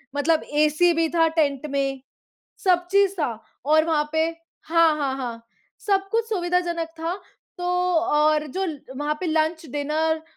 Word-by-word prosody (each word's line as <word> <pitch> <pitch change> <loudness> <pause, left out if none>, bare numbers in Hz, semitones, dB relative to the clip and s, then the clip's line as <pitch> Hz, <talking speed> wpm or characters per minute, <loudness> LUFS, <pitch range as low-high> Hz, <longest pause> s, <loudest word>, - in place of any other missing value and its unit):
मतलब 310 +3 +2 0.2
एसी 325 +4 +3
भी 330 0 +1
था 330 -1 +3
टेंट 285 -1 +1
में, 275 -1 -1 0.6
सब 355 -2 +2
चीज़ 395 -1 +4
था 275 -6 0 0.3
और 310 +2 +4
वहाँ 300 -2 0
पे 320 0 +2 0.4
हाँ, 330 -1 +4
हाँ, 275 -3 -1
हाँ, 235 -3 -5 0.4
सब 390 -2 0
कुछ 460 0 +1
सुविधाजनक 350 -4 -1
था 330 +2 -2 0.4
तो 355 - -6
और 325 -4 +2
जो 385 0 0 0.3
वहाँ 295 +1 -1
पे 370 - -3
लंच, 320 +1 0
डिनर 310 +3 0
320 Hz, 150 wpm, -23 LUFS, 300-350 Hz, 0.6 s, चीज़